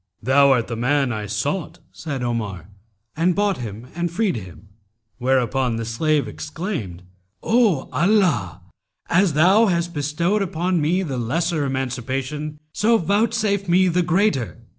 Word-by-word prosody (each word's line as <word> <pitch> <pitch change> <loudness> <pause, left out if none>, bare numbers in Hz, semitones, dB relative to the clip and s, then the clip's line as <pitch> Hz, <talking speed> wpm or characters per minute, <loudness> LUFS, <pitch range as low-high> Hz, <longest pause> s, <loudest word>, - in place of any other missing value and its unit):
'Thou 140 +3 +5
art 125 -4 +3
the 115 - -5
man 130 +3 +1
I 105 -1 -4
sought,' 145 - -3
said 140 -6 -5
Omar, 105 -8 -3 0.5
and 170 +2 +1
bought 205 -2 +1
him 115 -1 -7
and 175 +1 -2
freed 195 - 0
him; 95 -1 -10 0.5
whereupon 130 -1 +1
the 115 0 -3
slave 150 +6 0
exclaimed, 150 - -5 0.4
'O 220 - +2
Allah, 170 - +1 0.5
as 185 -2 +3
thou 190 +9 +5
hast 170 -2 0
bestowed 170 +7 -1
on 175 +1 +1
me 175 +6 +1
the 135 -7 -3
lesser 160 +6 -1
emancipation; 135 +3 -3 0.2
so 225 +2 +3
vouchsafe 200 0 0
me 185 +2 +4
the 180 +1 +2
greater!' 170 - +1
150 Hz, 140 wpm, -22 LUFS, 125-180 Hz, 0.5 s, Thou